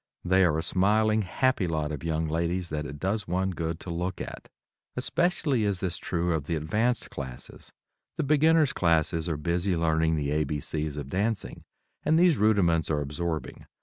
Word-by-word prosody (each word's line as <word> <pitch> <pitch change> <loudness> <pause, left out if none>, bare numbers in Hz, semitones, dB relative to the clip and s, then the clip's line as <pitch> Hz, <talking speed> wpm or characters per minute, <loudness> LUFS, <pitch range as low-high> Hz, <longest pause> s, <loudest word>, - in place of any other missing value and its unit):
They 95 +1 +4
are 80 -3 +2
a 80 - -1
smiling 110 +5 +2
happy 110 +1 +1
lot 75 -2 -1
of 75 -1 -5
young 80 -1 -1
ladies 85 +3 -1
that 75 -1 -3
it 75 - -8
does 100 +5 -2
one 95 +2 0
good 80 -2 -3
to 90 - -6
look 90 +2 -3
at. - - -7 0.5
Especially 150 -9 0
is 100 -3 0
this 90 -2 -2
true 85 0 -1
of 75 -3 -2
the 85 - -1
advanced 110 +11 -1
classes; 65 -3 -8 0.5
the - - 0
beginners' 150 +1 +4
classes 80 -1 +1
are 80 - -1
busy 85 +5 0
learning 80 0 +2
the 70 -2 -1
A, 75 +1 +2
B, 75 +1 -3
C's 75 -1 -2
of 70 -2 -5
dancing, 105 +3 -2 0.4
and 160 - +2
these 170 - +4
rudiments 95 -7 +3
are 75 -2 +1
absorbing. 80 +3 -4
85 Hz, 180 wpm, -27 LUFS, 80-100 Hz, 0.5 s, They